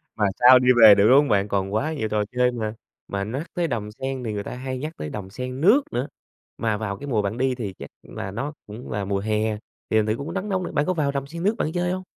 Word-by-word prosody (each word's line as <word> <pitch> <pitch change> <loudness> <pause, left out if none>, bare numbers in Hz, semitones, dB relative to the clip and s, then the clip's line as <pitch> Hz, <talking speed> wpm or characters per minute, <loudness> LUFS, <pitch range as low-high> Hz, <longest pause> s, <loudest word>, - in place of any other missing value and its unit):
Mà 105 - +1
sao 125 +1 +8
đi 125 - -1
về 105 -2 +10
được, 100 +1 +4
đúng 130 - +7
hông 145 - +2
bạn? 100 -1 +2
Còn 100 0 -1
quá 150 +9 0
nhiều 110 -8 -2
trò 105 0 +1
chơi 125 0 +2
mà. 110 -3 -3 0.3
Mà 100 0 -3
nhắc 135 - -5
tới 175 -1 0
Đầm 110 -5 -3
Sen 130 +3 -5
thì 110 -3 -3
người 100 - -3
ta - - -6
hay 130 0 -4
nhắc 155 +5 -5
tới 75 - -5
Đầm 95 +2 -6
Sen 125 +5 -6
Nước 215 - +6
nữa, 125 +4 -2 0.5
mà 110 -2 0
vào 100 -2 -4
cái 145 - -8
mùa 115 -6 +1
bạn 100 +3 -3
đi 130 0 +1
thì 105 -6 -5
chắc - - -8
là 95 - -7
nó 140 +9 -4
cũng 110 +4 -9
là 105 -1 -2
mùa 100 0 -1
hè, 110 +1 -1 0.3
thì 110 - +2
thành 110 - +3
thử 110 +1 0
cũng 155 +4 -6
nắng 195 +2 -3
nóng 185 -1 0
nữa, - - -5
bạn 145 - +1
có 185 - +1
vào 150 -5 0
Đầm 140 -1 -3
Sen 170 +3 -7
Nước 210 +4 +2
bạn 155 - -1
chơi 175 0 0
hông? 185 0 -3
125 Hz, 290 wpm, -24 LUFS, 105-145 Hz, 0.5 s, về